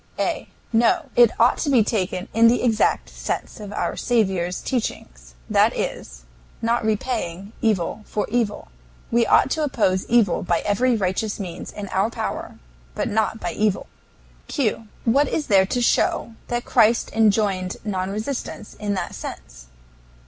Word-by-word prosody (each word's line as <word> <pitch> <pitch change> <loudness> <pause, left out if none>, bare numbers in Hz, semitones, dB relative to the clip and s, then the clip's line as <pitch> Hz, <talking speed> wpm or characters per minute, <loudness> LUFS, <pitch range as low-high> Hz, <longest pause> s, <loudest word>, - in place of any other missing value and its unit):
A. - - -2 0.2
No; 230 +1 +2
it 240 -2 +7
ought 235 +2 +4
to 300 - -1
be 250 -5 +5
taken 185 -4 -2
in 230 +1 +6
the 245 +2 +3
exact 225 -3 +2
sense - - -5
of 205 -1 -8
our 205 - -2
Saviour's 190 -7 0
teaching 250 -4 -2 0.4
that - - +3
is, - - -5 0.4
not 235 +1 0
repaying 210 -3 -2
evil 215 -2 0
for 210 - -1
evil. 230 -3 -1 0.4
We 235 0 +3
ought 265 - +4
to 315 - 0
oppose 195 -9 +1
evil 225 -7 +3
by 170 -2 0
every 240 +5 +2
righteous 205 +1 -1
means 180 -3 -6
in 205 -1 -7
our 195 +4 +1
power, - - -5 0.4
but - - -1
not 220 +1 0
by - - -3
evil. 210 -2 0 0.6
Q. 225 -6 -1 0.2
What 275 +5 +4
is 305 - -1
there 190 -2 +4
to 245 - -1
show 235 - +1
that 240 0 -2
Christ 230 -1 +3
enjoined 205 -4 +2
non 190 -3 -2
resistance 215 +2 -5
in 205 -1 -3
that 185 -2 -3
sense? - - -9
215 Hz, 155 wpm, -23 LUFS, 190-235 Hz, 0.6 s, it